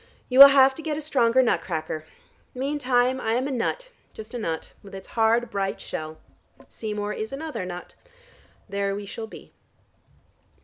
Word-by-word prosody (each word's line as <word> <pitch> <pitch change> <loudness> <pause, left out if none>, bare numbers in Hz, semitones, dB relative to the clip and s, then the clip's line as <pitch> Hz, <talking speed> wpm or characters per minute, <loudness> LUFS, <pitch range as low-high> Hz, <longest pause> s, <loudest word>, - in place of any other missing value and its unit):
You 255 +1 +2
will 280 - +14
have 270 -1 +5
to 320 - -9
get 310 -2 -3
a - - -2
stronger 260 -4 +3
nut 240 - +1
cracker. 155 -2 -4 0.5
Meantime 260 -2 0
I 225 - 0
am 255 +3 0
a - - -4
nut, - - -2 0.2
just 220 +2 -10
a 245 - -4
nut, 165 -7 -4
with 195 -1 -12
its 190 - -10
hard 230 +1 +1
bright 195 -1 -2
shell. 155 0 -6 0.5
Seymour 210 -1 -4
is 220 +1 -5
another 280 -9 -5
nut. 180 0 -8 0.7
There 200 -1 -2
we 205 0 -6
shall 220 +3 -7
be." - - -13
230 Hz, 170 wpm, -25 LUFS, 200-265 Hz, 0.7 s, will